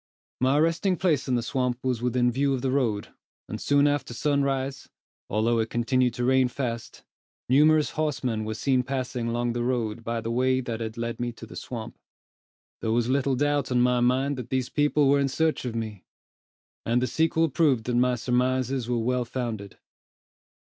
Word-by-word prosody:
My 130 +3 +3
resting 165 +4 +2
place 160 -8 +1
in 130 - +1
the 120 - 0
swamp 125 -1 -1
was 125 -3 -1
within 125 0 +2
view 135 +2 +1
of 125 - -5
the 130 - +1
road; 115 -7 0 0.4
and, - - -6
soon 145 0 +3
after 145 -4 -1
sunrise, 140 -1 -1 0.4
although 115 +2 +1
it 110 0 -1
continued 125 +1 +1
to 125 - -2
rain 130 0 +4
fast, 120 -2 -5 0.4
numerous 150 +2 +4
horsemen 130 -8 -1
were 110 0 -4
seen 130 +2 +1
passing 125 -2 -3
along 120 0 -1
the 120 - -2
road 120 -3 -1
by 115 0 -2
the 115 +1 -4
way 130 +2 +2
that 120 -3 -4
had 110 -1 -5
led 115 0 -3
me 120 0 -2
to - - -10
the - - -12
swamp. 115 -3 -7 0.8
There 110 - -1
was 120 +1 +1
little 135 0 +1
doubt 145 0 0
on 125 -1 +3
my 125 0 +3
mind 130 +3 +1
that 125 -2 -6
these 130 -2 -1
people 145 -1 +2
were 140 +1 +4
in 140 - +2
search 155 +1 0
of 120 -2 -3
me, 110 -4 -5 0.8
and 120 +2 +1
the 125 - +1
sequel 160 +3 +1
proved 140 -5 +2
that 125 - -2
my 125 +1 +3
surmises 125 +1 0
were 120 - +1
well 125 +2 0
founded. 115 -5 -5
125 Hz, 190 wpm, -26 LUFS, 120-135 Hz, 0.8 s, rain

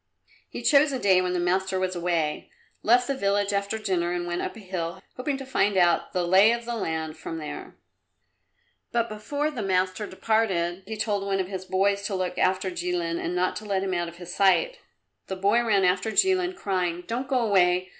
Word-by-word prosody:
He - - -7
chose 290 0 +5
a 265 - -1
day 190 -5 +4
when 180 0 -1
the 180 - 0
master 185 +2 0
was 185 0 -1
away, 170 -3 -1 0.3
left 245 +3 +4
the 275 - -1
village 200 -4 0
after 200 +2 -1
dinner 180 -5 -1
and 175 0 -2
went 175 0 -2
up - - -4
a - - -10
hill, 185 -3 -4 0.2
hoping 270 +2 -2
to 270 - -7
find 205 -6 +1
out 175 -2 +3
the 180 - 0
lie 190 +5 +6
of 235 0 -1
the 240 - -3
land 160 -6 -3
from 165 - -6
there. 155 -2 -7 1.2
But 235 -1 0
before 285 +8 -2
the 250 -7 -5
master 190 +1 0
departed 190 -4 0
he 220 0 -5
told 205 -2 -1
one 195 -1 -1
of 185 -1 -2
his 190 -1 -5
boys 195 +2 +1
to 200 - -3
look 180 -1 -2
after 185 0 +1
Jilin 175 -1 -2
and 175 - -2
not 185 +3 0
let 200 -3 -1
him 190 -1 -2
out 175 -1 -1
of 170 0 -10
his 175 0 -8
sight. - - +3 0.5
The 190 - -3
boy 200 +5 +2
ran 200 -5 +3
after 180 +4 +1
Jilin, 370 - +2
crying, 180 - -2
"Don't 240 +7 -3
go 260 -2 +1
away! 185 -4 +2
190 Hz, 205 wpm, -26 LUFS, 180-220 Hz, 1.2 s, lie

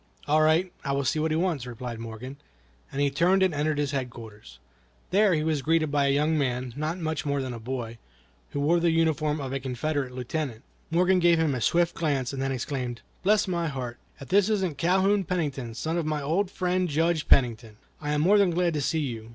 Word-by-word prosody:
"All 155 +1 +4
right, 160 +4 +3
I 140 - -1
will 140 0 0
see 140 +4 0
what 160 +1 +1
he 155 - +1
wants," 165 -8 -1
replied 120 -1 -6
Morgan, 115 +4 -7 0.5
as 135 - -4
he 145 -1 +2
turned 180 +6 +3
and 185 -3 +2
entered 150 +1 0
his 145 -1 0
headquarters. 115 - -7 0.5
There 200 -2 +4
he 155 - 0
was 155 -2 0
greeted 155 +1 +1
by 140 -1 +2
a - - +3
young 150 +3 +2
man, 125 -2 -2
not 155 +4 -2
much 160 -3 -2
more 140 -1 -1
than 130 -2 -3
a 115 - -7
boy, 115 -1 -5 0.5
who - - -4
wore 165 +4 +3
the 170 0 +2
uniform 155 -2 +1
of 135 -2 -4
a 135 - -1
Confederate 135 +1 -2
lieutenant. 125 -1 -4 0.3
Morgan 180 +3 +3
gave 170 -1 +4
him 160 -3 +1
a 125 - -3
swift 170 +6 +2
glance, 140 -5 -1
and 135 - -3
then 135 0 -1
exclaimed: 125 -2 -3 0.2
"Bless 210 +2 +3
my 170 -2 -1
heart! 125 -5 -5 0.2
if 135 - -10
this 200 +2 +4
isn't 190 -9 -1
Calhoun 190 +4 +3
Pennington, 140 -10 -3
son 160 +7 -2
of 165 - -2
my 155 -1 -1
old 175 +7 0
friend 180 -1 0
Judge 160 +1 +1
Pennington! 115 -4 +2 0.2
I 150 -1 -2
am 150 - +1
more 200 +6 +5
than 200 -2 +4
glad 175 0 +1
to 150 - -1
see 160 +3 0
you. 115 -5 -5
150 Hz, 220 wpm, -27 LUFS, 130-170 Hz, 0.5 s, more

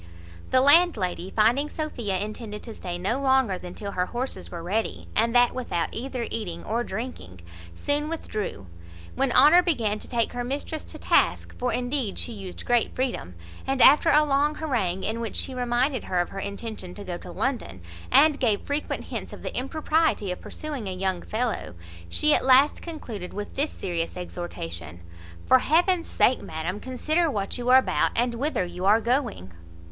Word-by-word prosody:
The 255 - +4
landlady 270 - +4
finding 235 +9 +2
Sophia 240 -12 -3
intended 210 +1 -5
to 230 - -8
stay 175 -4 -5
no 200 +9 -1
longer 265 -8 +2
than 180 0 -9
till 200 -1 -5
her 180 -1 -1
horses 250 +2 -4
were 170 -1 -7
ready, 210 +6 -2
and 230 +2 +2
that 245 0 +5
without 235 -10 -2
either 250 0 -3
eating 175 -7 -3
or 230 +2 -1
drinking, 190 - -6 0.3
soon 290 - 0
withdrew; 215 - -4 0.5
when 270 -1 0
Honour 300 +8 +7
began 230 - 0
to - - -9
take 235 -2 0
her 245 0 -3
mistress 285 +5 -4
to - - -9
task - - +1
(for 250 0 0
indeed 245 -3 -1
she - - -3
used 195 -4 -8
great 240 -1 +1
freedom), 240 - -2 0.3
and 270 0 0
after 295 +5 +7
a 300 0 +6
long 290 +1 +2
harangue, 220 - -1
in 220 +2 -2
which 230 -2 -4
she 265 - -2
reminded 250 +1 0
her 180 - 0
of 175 - 0
her 195 - -6
intention 200 -2 -6
to 205 - -8
go 175 -3 -5
to 180 - -10
London, 250 - -2 0.3
and 300 -1 +5
gave 220 -5 +2
frequent 290 +1 -3
hints - - -6
of - - -10
the - - -5
impropriety 305 - +1
of 180 - -6
pursuing 290 -9 -6
a 185 - -3
young 185 -1 -1
fellow, 225 - -3 0.3
she 300 - +3
at - - +2
last 265 +3 +5
concluded 230 - -7
with 205 0 -5
this 290 +3 0
serious 170 -2 -4
exhortation: 85 - -6 0.4
"For 260 - +6
heaven's 340 +5 +2
sake, 255 - +2
madam, 165 +5 -4
consider 310 +7 0
what 205 -2 -3
you 245 0 -2
are 255 - +9
about, 260 - +2
and 240 +1 +1
whither 255 -5 -1
you 180 +1 -5
are 210 +3 +6
going." 235 - -1
235 Hz, 180 wpm, -26 LUFS, 190-270 Hz, 0.5 s, are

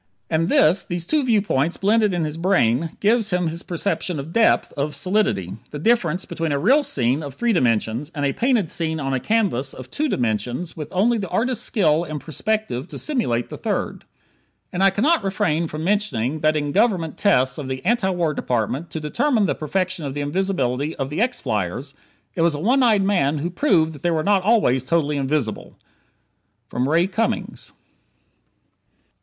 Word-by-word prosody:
And 165 +2 +1
this 175 +5 +4
these 175 -1 -4
two 305 - +1
viewpoints 200 - +1
blended 210 +1 +2
in 175 -2 -1
his 150 0 -4
brain 165 - +1
gives 220 +1 +2
him 180 -1 0
his 165 +1 -5
perception 180 -2 -2
of 150 +4 -7
"depth," 230 -1 +3
of 145 0 -2
"solidity" 110 - 0
the 150 - -6
difference 180 -1 +1
between 165 -2 -3
a 140 - +1
real 255 - +4
scene 130 - 0
of 140 -3 -7
three 235 +5 +1
dimensions 120 - 0
and 145 -1 -1
a 135 - +1
painted 240 -7 +1
scene 160 -1 -2
on 135 -2 -2
a 130 - +1
canvas 185 - 0
of 130 0 -10
two 305 0 -1
dimensions 120 - -2
with 150 -3 -6
only 220 +5 +2
the 190 -3 -4
artist's 245 0 0
skill 165 -7 +2
in 155 -3 -5
perspective 160 - -2
to - - -8
simulate 205 - -1
the - - -7
third. - - -3 0.7
And 180 +2 0
I 195 - +7
cannot 250 - +2
refrain 170 -4 0
from 155 0 -6
mentioning 160 - 0
that 155 +1 +2
in 145 -1 -1
Government 190 -5 +1
tests 130 -10 +2
of 140 - -5
the 130 +4 -5
Anti 225 -2 +2
War 175 -4 0
Department 125 +6 -2
to 160 - -5
determine 225 - +1
the - - +1
perfection 185 +2 -2
of 140 -1 -4
the 145 - -2
invisibility 145 -4 -1
of 135 0 -4
the 160 +7 -1
X 250 +2 0
flyers, 110 - -3 0.4
it 165 - -2
was 165 -2 +3
a - - -4
one 250 - +3
eyed 220 -5 +4
man 165 -7 +1
who 165 +5 -3
proved 170 - +2
that 145 - -12
they 175 - +1
were 160 -2 0
not 200 0 +3
always 185 - +2
totally 150 +1 0
invisible! 135 -5 -2 1.0
Ray 150 +8 +2
Cummings. 210 +4 -3
165 Hz, 185 wpm, -22 LUFS, 140-200 Hz, 1.0 s, I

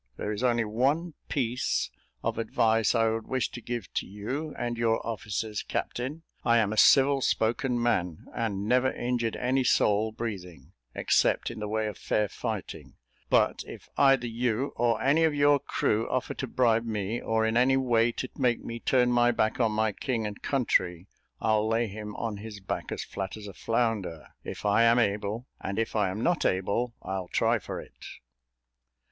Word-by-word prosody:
There 105 - -3
is 105 - -3
only 120 -2 +2
one 140 +10 0 0.2
piece 125 -3 -1 0.3
of - - -1
advice 115 0 +2
I 115 -1 +3
would 110 0 -3
wish 130 -2 -1
to 120 - -8
give 120 -4 -5
to - - -2
you 130 +11 -4
and 120 0 -2
your 115 -1 0
officers, 105 -1 -3
captain. 140 +7 -4 0.2
I 120 0 +4
am 110 -2 +2
a - - -3
civil 135 +4 +6
spoken 120 +2 +1
man, 90 -9 0
and 105 -4 -2
never 125 +2 +3
injured 120 -2 -1
any 130 +1 +1
soul 110 -2 +3
breathing, 90 - -6 0.2
except - - +2
in 115 - -8
the 105 - -3
way 110 +1 -1
of 105 - -5
fair 105 -1 +1
fighting; 110 -6 -5 0.3
but - - +3
if - - -11
either 135 -3 +4
you, 120 +2 -1
or 120 -1 +1
any 145 +5 +3
of 160 -2 +2
your 145 0 +4
crew, 115 -5 0
offer 130 0 -1
to 135 - -4
bribe 115 -2 +2
me, 105 +1 -2
or 110 0 +1
in 110 +1 0
any 130 +2 +4
way 120 -3 +3
to 130 +2 -5
make 125 -3 +1
me 115 0 -5
turn 125 0 +2
my 120 0 +4
back 110 0 0
on 115 -3 +3
my 110 0 +1
king 115 +1 -2
and 105 -1 -6
country, 95 -10 0 0.3
I'll 110 -1 +2
lay 115 +1 +1
him 105 0 -7
on 115 -3 -3
his 105 0 -8
back 95 - -4
as - - -3
flat 95 +2 -5
as 105 - -9
a 100 - -8
flounder, 110 -9 -1
if - - -7
I 105 +2 +4
am 115 +1 +5
able, 105 +1 0
and 100 +1 -4
if 115 0 -1
I 105 -3 +2
am 95 +4 -4
not 175 -2 +2
able, 110 +6 0
I'll 95 -1 -4
try - - +2
for - - -6
it." - - -12
115 Hz, 185 wpm, -28 LUFS, 105-125 Hz, 0.3 s, civil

